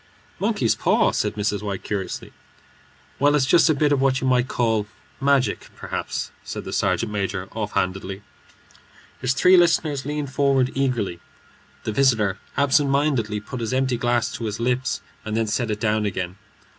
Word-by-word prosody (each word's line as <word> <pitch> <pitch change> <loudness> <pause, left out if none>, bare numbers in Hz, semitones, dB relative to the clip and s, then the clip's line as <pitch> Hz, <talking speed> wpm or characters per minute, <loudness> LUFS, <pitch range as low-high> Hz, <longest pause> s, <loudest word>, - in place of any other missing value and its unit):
"Monkey's 195 - +1
paw?" - - +2
said - - -1
Mrs. 105 0 -1
White, 100 -2 -4
curiously. 100 -3 -4 0.9
"Well, 145 +1 +4
it's 140 -3 +3
just 165 +4 +5
a 155 - +4
bit 145 +1 +2
of 140 -2 +2
what 135 -1 +2
you - - -3
might 125 -1 +3
call 110 -5 0 0.3
magic, 135 -5 +1
perhaps," - - -4
said - - -6
the - - -6
sergeant 115 -2 0
major, 95 -2 -2
offhandedly. 95 -2 -2 1.0
His 125 0 +1
three 180 +5 +6
listeners 160 -5 +3
leaned 145 -1 -4
forward 135 -3 +2
eagerly. 125 -10 -1 0.6
The - - -2
visitor 110 -6 +2 0.2
absent 140 0 +3
mindedly 135 -7 +1
put 125 +4 -7
his 115 +2 -2
empty 130 -1 +1
glass 120 -2 +1
to 115 - -5
his 105 0 -3
lips 125 +2 0 0.2
and 110 0 -3
then 115 - +2
set 115 +2 -1
it 105 -1 -2
down 110 -1 +1
again. 90 -2 -3
120 Hz, 165 wpm, -23 LUFS, 105-140 Hz, 1.0 s, three